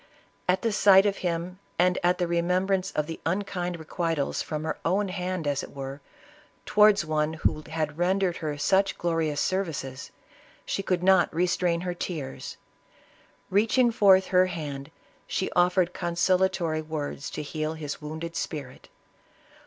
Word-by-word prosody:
At 185 - +2
the 230 - +1
sight 200 -1 +6
of 200 -1 +1
him, 175 +1 -3 0.2
and 180 +1 +3
at 180 +1 +3
the 180 - 0
remembrance 180 +3 +1
of 150 - 0
the 165 +1 -7
unkind 180 -1 -2
requi 165 +1 -2
tals, 140 -2 -1
from 155 -1 -4
her 160 - -3
own 195 +4 +1
hand 180 -2 -3
as 145 -1 0
it - - -10
were, 135 +1 -6 0.6
towards 210 -4 +5
one 155 0 0
who 160 -1 0
had 155 -1 -3
rendered 185 0 +1
her 150 -2 -3
such 195 +6 +2
glorious 165 -3 0
services, 160 -9 -2 0.6
she - - -2
could 180 -2 -1
not 190 0 +5
restrain 175 0 +1
her 180 0 -2
tears; 140 -7 -5 0.9
reaching 225 +5 +3
forth 190 -4 +5
her 185 0 +4
hand, 145 -5 -5 0.4
she 190 - -2
offered 180 0 +2
consolatory 175 -2 +1
words 155 -2 -5
to 150 - -5
heal 155 +1 -3
his 150 -2 -6
wounded 160 +2 -6
spirit. 140 -5 -5
175 Hz, 150 wpm, -27 LUFS, 155-185 Hz, 0.9 s, sight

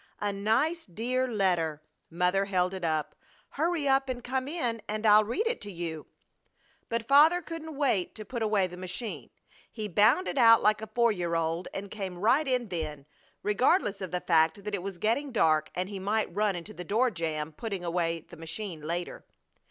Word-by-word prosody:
A 205 -1 -1
nice, 255 +12 0
dear 250 +8 -1
letter!" 180 -9 0 0.3
Mother 180 +3 +1
held 185 -1 0
it 190 -2 -6
up, 155 -2 -1 0.4
"Hurry 320 0 -1
up 270 0 +3
and 245 -1 -4
come 260 +1 -2
in 245 -8 -1
and 215 +1 -3
I'll 210 0 +7
read 240 - -1
it 465 0 0
to 205 - -6
you." 165 -3 -5 0.8
But 230 -1 -2
Father 305 +5 +6
couldn't 320 -2 -7
wait 250 -11 +1
to 215 - -7
put 240 +2 -5
away 210 -3 +2
the 180 0 -8
machine. 185 +5 -5 0.4
He 215 -3 -4
bounded 230 - +3
out 230 -1 +7
like 215 0 +3
a 220 - -5
four 235 -1 +4
year 175 -4 -2
old 165 +2 -1
and 200 +1 -6
came 190 -4 -5
right 250 - +3
in 250 -4 0
then, 155 -5 -4 0.4
regardless 210 - +2
of 190 - -4
the 180 +1 -2
fact 160 +3 +2
that 210 0 -5
it 200 - -1
was 195 -1 -6
getting 235 +9 0
dark 155 -9 +2
and 180 +1 -1
he 200 -1 -6
might 205 0 -1
run 210 -2 +1
into 170 -2 -7
the 180 - -7
door 230 +8 +1
jamb 160 -3 -3
putting 195 +2 -5
away 170 -1 -1
the 170 - -15
machine 165 +1 -6
later. 170 +3 -4
205 Hz, 190 wpm, -29 LUFS, 175-240 Hz, 0.8 s, I'll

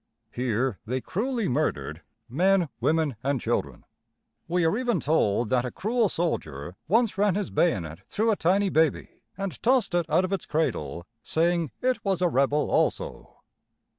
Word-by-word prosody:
Here 125 -2 -1
they 125 +4 -2
cruelly 230 - -2
murdered 80 - -1 0.3
men, 180 +5 +2
women, 155 -6 +1
and 140 0 0
children. 70 - -2 0.6
We 175 0 +1
are 160 - +2
even 240 -5 0
told 120 -8 +1
that 125 -1 +2
a 125 - -3
cruel 225 - 0
soldier 85 - -3
once 225 +2 +2
ran 205 -2 +3
his 205 -1 -2
bayonet 85 - 0
through 220 +2 +1
a - - +2
tiny 195 +3 +2
baby, 160 -4 0 0.2
and 195 -2 -5
tossed 245 -6 +2
it 175 -1 +1
out 165 +5 +3
of 185 - -3
its 195 - -3
cradle, 150 - -2 0.2
saying 170 +1 +1
it 255 0 +1
was 190 -3 0
a - - +5
rebel 140 +1 +1
also! - - -1
165 Hz, 160 wpm, -26 LUFS, 125-195 Hz, 0.6 s, a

